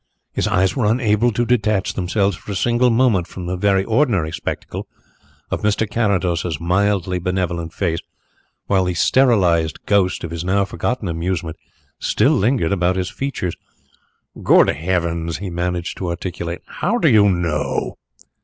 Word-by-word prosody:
His -, -, 0 dB
eyes 95 Hz, -3 st, +2 dB
were 125 Hz, -6 st, +1 dB
unable 115 Hz, 0 st, +2 dB
to 120 Hz, +2 st, 0 dB
detach 105 Hz, -4 st, +1 dB
themselves 95 Hz, +1 st, 0 dB
for 90 Hz, -, -9 dB
a -, -, -3 dB
single 120 Hz, +5 st, +2 dB
moment 115 Hz, -7 st, +2 dB
from 90 Hz, -, -8 dB
the 90 Hz, +1 st, -2 dB
very 95 Hz, 0 st, +2 dB
ordinary 110 Hz, -, +1 dB
spectacle -, -, -5 dB, 0.6 s
of -, -, -2 dB
Mr. 105 Hz, +1 st, +1 dB
Carrados's 90 Hz, -7 st, 0 dB
mildly 90 Hz, +1 st, +1 dB
benevolent 90 Hz, -2 st, -2 dB
face, 85 Hz, -3 st, -1 dB, 0.7 s
while 95 Hz, -2 st, +2 dB
the 90 Hz, -1 st, -1 dB
sterilized 90 Hz, -, +2 dB
ghost 100 Hz, -3 st, +1 dB
of 85 Hz, -, -5 dB
his 85 Hz, 0 st, -4 dB
now 100 Hz, +2 st, +1 dB
forgotten 110 Hz, +2 st, -3 dB
amusement 85 Hz, -1 st, -3 dB, 0.4 s
still -, -, +2 dB
lingered 110 Hz, -4 st, +1 dB
about 90 Hz, -1 st, +1 dB
his 95 Hz, 0 st, -2 dB
features. 125 Hz, -11 st, -3 dB, 0.9 s
"Good -, -, +5 dB
heavens!" 85 Hz, -1 st, -1 dB
he 95 Hz, +1 st, -6 dB
managed 90 Hz, 0 st, -3 dB
to 90 Hz, -, -2 dB
articulate, 85 Hz, 0 st, -5 dB
"how 215 Hz, +7 st, -1 dB
do 200 Hz, -, +2 dB
you 105 Hz, -6 st, +5 dB
know?" 85 Hz, -5 st, -1 dB
95 Hz, 150 wpm, -20 LUFS, 85-105 Hz, 0.9 s, Good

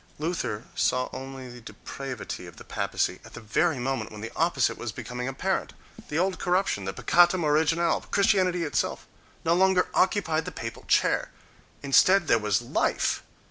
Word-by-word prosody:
—Luther 150 Hz, -9 st, -2 dB
saw 125 Hz, 0 st, +1 dB
only 130 Hz, 0 st, -7 dB
the 120 Hz, 0 st, -11 dB
depravity 130 Hz, +3 st, -7 dB
of -, -, -13 dB
the -, -, -10 dB
papacy -, -, -2 dB
at -, -, -13 dB
the -, -, -7 dB
very 145 Hz, +8 st, +1 dB
moment 125 Hz, -3 st, -2 dB
when 105 Hz, -1 st, -9 dB
the 115 Hz, +1 st, -6 dB
oppo 165 Hz, -3 st, 0 dB
site -, -, +3 dB
was 120 Hz, -, -4 dB
becoming 125 Hz, +4 st, -5 dB
apparent: 180 Hz, +9 st, -2 dB, 0.4 s
the 150 Hz, -, -2 dB
old 185 Hz, +2 st, 0 dB
corruption, 180 Hz, -, 0 dB
the 95 Hz, -, -3 dB
peccatum 175 Hz, -1 st, +4 dB
originale, 160 Hz, +3 st, +2 dB
Christianity 185 Hz, -3 st, +2 dB
itself, 150 Hz, -, -1 dB, 0.4 s
no 165 Hz, -, +4 dB
longer 185 Hz, +1 st, +3 dB
occupied 165 Hz, -5 st, +1 dB
the -, -, -5 dB
papal -, -, -7 dB
chair! -, -, +2 dB, 0.5 s
Instead 175 Hz, +6 st, +5 dB
there 115 Hz, -, +4 dB
was 105 Hz, +1 st, 0 dB
life! 120 Hz, -, 0 dB
150 Hz, 165 wpm, -27 LUFS, 125-175 Hz, 0.5 s, Instead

